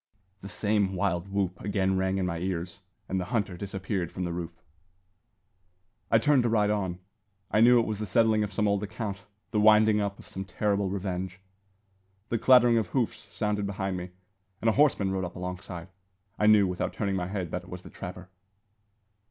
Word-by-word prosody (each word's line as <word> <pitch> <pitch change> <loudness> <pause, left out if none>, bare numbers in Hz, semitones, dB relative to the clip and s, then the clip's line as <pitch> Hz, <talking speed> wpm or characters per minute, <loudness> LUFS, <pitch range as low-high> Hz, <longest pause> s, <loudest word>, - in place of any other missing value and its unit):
The 100 - -8
same 105 -2 0
wild 90 0 -1
whoop 95 -2 -2
again 95 -1 0
rang 95 0 0
in 95 - 0
my 85 -2 -2
ears, 90 0 -3 0.3
and 95 - -1
the - - -3
hunter 100 -3 -1
disappeared 95 -1 -3
from 90 - -4
the 85 -1 -2
root. 85 -1 -4 1.6
I 115 - +5
turned 140 +3 +4
to 120 - +1
ride 105 -2 +2
on. 95 -4 -1 0.5
I 105 - +3
knew 120 +1 +7
it 115 - +1
was 105 -1 -3
the 105 - -3
settling 110 +2 +3
of 105 - -3
some 105 +2 +1
old 100 -1 +1
account, 105 -1 -5 0.3
the 110 - +1
winding 105 0 +5
up 100 -1 -2
of - - -13
some 95 - -5
terrible 100 +1 0
revenge. 95 -1 -4 0.9
The 115 - 0
clattering 120 -2 +6
of 110 - -2
hoofs 120 +2 -2
sounded 105 -1 -1
behind 95 -1 -3
me, 90 0 -5 0.5
and 115 - +2
a - - +3
horseman 130 -9 +3
rode 95 -1 -1
up 90 -1 -5
alongside. 90 -1 -6 0.5
I 105 - +3
knew, 105 -2 +7
without 90 -1 -2
turning 100 -2 -1
my 90 -2 -2
head, 95 -4 -4
that - - -4
it - - -15
was 90 0 -8
the - - -12
trapper. 90 -1 -8
100 Hz, 195 wpm, -28 LUFS, 90-105 Hz, 1.6 s, knew